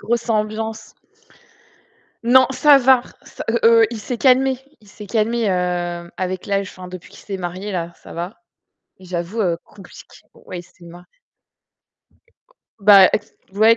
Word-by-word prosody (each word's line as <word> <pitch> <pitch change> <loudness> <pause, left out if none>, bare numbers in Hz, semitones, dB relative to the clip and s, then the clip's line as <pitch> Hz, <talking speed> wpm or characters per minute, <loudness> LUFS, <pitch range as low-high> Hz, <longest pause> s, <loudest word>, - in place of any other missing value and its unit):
grosse 235 +1 -2
ambiance. 220 +1 -3 1.3
Non, 255 +2 +6
ça 285 +1 +5
va 260 0 +6
r - - -17 0.3
heu, - - +1 0.2
heu, - - +5
il 225 - -6
s'est 240 +3 -5
calmé. 260 0 +3 0.2
Il 210 - -21
s'est 205 +1 -11
calmé, 225 +1 0
heu, 175 -2 -2
avec 185 0 -4
l'âge, 200 -1 -1
enfin 185 -1 -11
depuis 180 -1 -10
qu'il - - -15
s'est 200 - -5
marié, 185 +3 -5
là, 170 -3 -4
ça - - -14
va. 180 - -7 0.6
J'avoue, 180 +3 -4
heu, 175 -5 +1
compliq 195 -3 -14 0.4
ouais, 180 - -7
il - - -13
s'est 175 0 -20
ma 175 +1 -13 1.7
Bah 195 -2 +8 0.5
ouais 220 +3 +5
200 Hz, 150 wpm, -20 LUFS, 180-230 Hz, 1.7 s, Bah